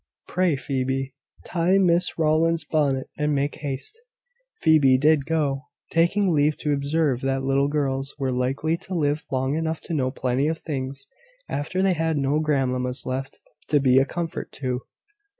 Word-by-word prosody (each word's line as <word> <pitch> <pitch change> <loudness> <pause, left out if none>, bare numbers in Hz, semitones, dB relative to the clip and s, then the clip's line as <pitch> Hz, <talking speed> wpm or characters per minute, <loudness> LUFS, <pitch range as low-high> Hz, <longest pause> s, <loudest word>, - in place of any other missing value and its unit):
Pray, 180 -4 +1
Phoebe, 135 0 -2 0.3
tie 180 +2 +2
Miss 180 -2 +2
Rowland's 160 0 +2
bonnet, 140 -4 0
and 150 0 +1
make 140 +1 0
haste." 145 - -5 0.6
Phoebe 145 -5 +5
did 150 0 +3
so, 145 -4 0 0.3
taking 175 +3 +2
leave 150 0 +2
to 150 -2 0
observe 140 -2 0
that 135 0 -1
little 135 +1 +2
girls 140 -2 -2
were 135 -3 -1
likely 135 +6 0
to 185 +2 -6
live 150 -1 0
long 130 +1 0
enough 160 0 -1
to - - -6
know 130 -4 +1
plenty 130 +1 0
of 160 0 -1
things 135 -3 -5 0.4
after 185 +6 -2
they 195 -1 +4
had 160 -1 0
no 140 +2 +1
grandmammas 130 -4 0
left 135 +1 -4 0.3
to 150 - +4
be 130 -1 +5
a 135 - +3
comfort 165 +2 -4
to. 125 -2 -3
145 Hz, 160 wpm, -24 LUFS, 135-160 Hz, 0.6 s, Phoebe